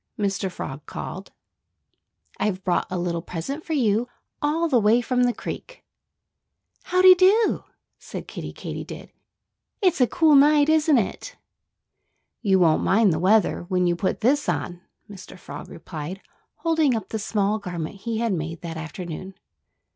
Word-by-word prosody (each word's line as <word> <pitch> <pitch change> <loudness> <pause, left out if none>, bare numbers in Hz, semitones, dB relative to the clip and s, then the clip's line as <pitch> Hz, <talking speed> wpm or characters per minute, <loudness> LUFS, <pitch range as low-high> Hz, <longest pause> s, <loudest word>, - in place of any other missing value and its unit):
Mr. 195 -2 -1
Frog 135 -4 -7
called. 190 +2 -7 1.1
"I've 190 -3 -1
brought 180 - 0
a 185 - -3
little 175 -1 -2
present 185 - -5
for 325 - -4
you, 235 -4 +1 0.3
all 315 +3 +1
the 260 -6 +3
way 220 +2 +4
from 250 +1 0
the 245 - +2
creek." - - -8 1.0
"How 365 0 +2
dy 370 0 +11
do!" 385 +5 +3 0.3
said - - -8
Kiddie - - -7
Katydid. - - -8 0.7
"It's 360 -8 +2
a 250 - +5
cool 315 +5 +3
night, 290 +1 +6
isn't 315 -2 +4
it?" 245 - -3 1.1
"You 195 -4 +3
won't 165 -4 +3
mind 200 -2 +3
the 155 - -1
weather 190 0 +2
when 180 -1 +1
you 175 -1 +2
put 185 +5 -2
this 280 +6 +2
on," 175 0 -3 0.3
Mr. 190 -2 -11
Frog - - -9
replied, 165 +3 -7 0.4
holding 320 -6 +1
up 220 - -5
the 220 - -3
small 205 0 0
garment 175 -1 -5
he 225 +3 -4
had 230 -2 0
made 165 -1 -4
that 165 -2 -6
afternoon. 175 +3 -7
210 Hz, 155 wpm, -24 LUFS, 180-285 Hz, 1.1 s, dy